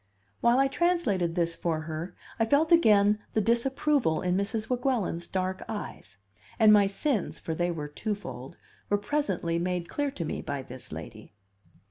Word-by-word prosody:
While 235 Hz, +1 st, +4 dB
I 270 Hz, +1 st, +4 dB
translated 270 Hz, -, +1 dB
this 170 Hz, -1 st, +1 dB
for 165 Hz, -2 st, -2 dB
her, 160 Hz, +3 st, -6 dB, 0.2 s
I 225 Hz, -, +4 dB
felt 290 Hz, +7 st, +2 dB
again 210 Hz, -10 st, +5 dB
the -, -, +2 dB
disapproval 235 Hz, -, +1 dB
in 180 Hz, 0 st, +1 dB
Mrs. 215 Hz, +3 st, -2 dB
Weguelin's 245 Hz, -9 st, -1 dB
dark 185 Hz, 0 st, -2 dB
eyes; 205 Hz, -, -7 dB, 0.4 s
and 215 Hz, -1 st, +7 dB
my 205 Hz, -1 st, +6 dB
sins 205 Hz, -, -1 dB
for 165 Hz, -, -4 dB
they 175 Hz, +2 st, 0 dB
were 155 Hz, -4 st, -4 dB
twofold 170 Hz, -, -5 dB, 0.3 s
were 205 Hz, -, +3 dB
presently 200 Hz, -, -1 dB
made 180 Hz, -1 st, -2 dB
clear 290 Hz, -1 st, -1 dB
to 175 Hz, -11 st, -5 dB
me -, -, -3 dB
by 140 Hz, -2 st, -4 dB
this 130 Hz, 0 st, -10 dB
lady. -, -, -9 dB
200 Hz, 160 wpm, -28 LUFS, 170-240 Hz, 0.4 s, and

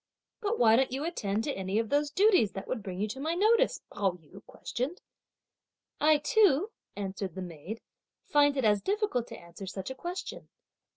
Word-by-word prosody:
"But 425 Hz, +1 st, 0 dB
why 225 Hz, -1 st, +6 dB
don't 265 Hz, 0 st, +2 dB
you 270 Hz, +3 st, -2 dB
attend 220 Hz, -, -1 dB
to 285 Hz, -, -1 dB
any 190 Hz, +2 st, -2 dB
of 225 Hz, -1 st, 0 dB
those 290 Hz, +1 st, +2 dB
duties 370 Hz, -, +4 dB
that 195 Hz, -, -6 dB
would 240 Hz, -, -2 dB
bring 185 Hz, -2 st, -6 dB
you 210 Hz, -, 0 dB
to 260 Hz, +5 st, -6 dB
my 315 Hz, +4 st, -1 dB
notice?" 450 Hz, +6 st, +3 dB
Pao 195 Hz, -3 st, +1 dB
yü 180 Hz, +4 st, -15 dB
questioned. 270 Hz, +9 st, -4 dB, 1.0 s
"I 305 Hz, 0 st, +5 dB
too," 390 Hz, -, +3 dB, 0.2 s
answered 195 Hz, -2 st, -4 dB
the 190 Hz, -, -4 dB
maid, 175 Hz, +6 st, -7 dB, 0.4 s
"find 290 Hz, -1 st, +3 dB
it 260 Hz, -, +1 dB
as 210 Hz, -2 st, +4 dB
difficult 405 Hz, -, 0 dB
to -, -, -9 dB
answer 170 Hz, +3 st, -10 dB
such 190 Hz, +5 st, -5 dB
a -, -, -6 dB
question. 350 Hz, +6 st, -6 dB
250 Hz, 185 wpm, -30 LUFS, 195-325 Hz, 1.0 s, why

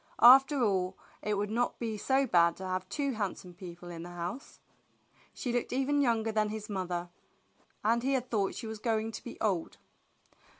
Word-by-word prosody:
After 270 Hz, +2 st, +8 dB
all, 190 Hz, -3 st, +1 dB, 0.2 s
it 210 Hz, 0 st, 0 dB
would 205 Hz, +1 st, -2 dB
not 240 Hz, +2 st, 0 dB
be 225 Hz, -2 st, -3 dB
so 265 Hz, +6 st, +2 dB
bad 170 Hz, -7 st, +4 dB
to 190 Hz, -, -6 dB
have 185 Hz, 0 st, -3 dB
two 280 Hz, +5 st, -1 dB
handsome 195 Hz, -5 st, -4 dB
people 175 Hz, -1 st, -9 dB
in 165 Hz, -1 st, -7 dB
the 175 Hz, -, -7 dB
house. 175 Hz, +9 st, -6 dB, 0.7 s
She 245 Hz, -, -4 dB
looked 245 Hz, -, -1 dB
even 270 Hz, +3 st, +1 dB
younger 225 Hz, -4 st, +2 dB
than 215 Hz, -1 st, +1 dB
his 215 Hz, 0 st, -6 dB
mother, 180 Hz, -2 st, -3 dB, 0.7 s
and 230 Hz, +3 st, +3 dB
he 270 Hz, +3 st, +1 dB
had 255 Hz, -1 st, -1 dB
thought 200 Hz, -4 st, 0 dB
she -, -, -6 dB
was 220 Hz, -1 st, -6 dB
going 225 Hz, 0 st, 0 dB
to -, -, -8 dB
be 240 Hz, -, -9 dB
old. 190 Hz, -7 st, -1 dB
215 Hz, 185 wpm, -31 LUFS, 185-245 Hz, 0.7 s, After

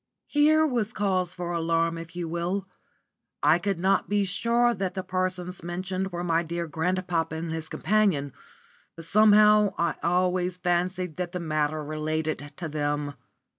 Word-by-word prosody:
Here 310 Hz, +2 st, +4 dB
was 240 Hz, -6 st, -1 dB
cause 185 Hz, -3 st, 0 dB
for 175 Hz, -1 st, -4 dB
alarm 165 Hz, 0 st, +1 dB
if 165 Hz, +1 st, -10 dB
you 175 Hz, -1 st, -3 dB
will. 175 Hz, +4 st, -2 dB, 0.8 s
I 165 Hz, -, +5 dB
could 195 Hz, 0 st, -1 dB
not 190 Hz, +2 st, +2 dB
be 205 Hz, 0 st, +2 dB
sure 235 Hz, +5 st, +2 dB
that 190 Hz, -4 st, -3 dB
the 190 Hz, -, -3 dB
persons 185 Hz, -1 st, -3 dB
mentioned 185 Hz, +2 st, -3 dB
were 175 Hz, 0 st, -4 dB
my 165 Hz, -1 st, +2 dB
dear 170 Hz, +1 st, -3 dB
grandfather 165 Hz, 0 st, -1 dB
and 160 Hz, 0 st, -4 dB
his 160 Hz, -1 st, -5 dB
companion, 175 Hz, -8 st, +1 dB, 0.6 s
but 165 Hz, 0 st, -9 dB
somehow 210 Hz, +1 st, +5 dB
I 170 Hz, -1 st, 0 dB
always 180 Hz, 0 st, +1 dB
fancied 180 Hz, -1 st, -1 dB
that 180 Hz, 0 st, -3 dB
the 180 Hz, -, -2 dB
matter 155 Hz, -2 st, -1 dB
related 155 Hz, 0 st, -3 dB
to 170 Hz, -, -4 dB
them. 145 Hz, -1 st, -2 dB
175 Hz, 155 wpm, -26 LUFS, 165-190 Hz, 0.8 s, I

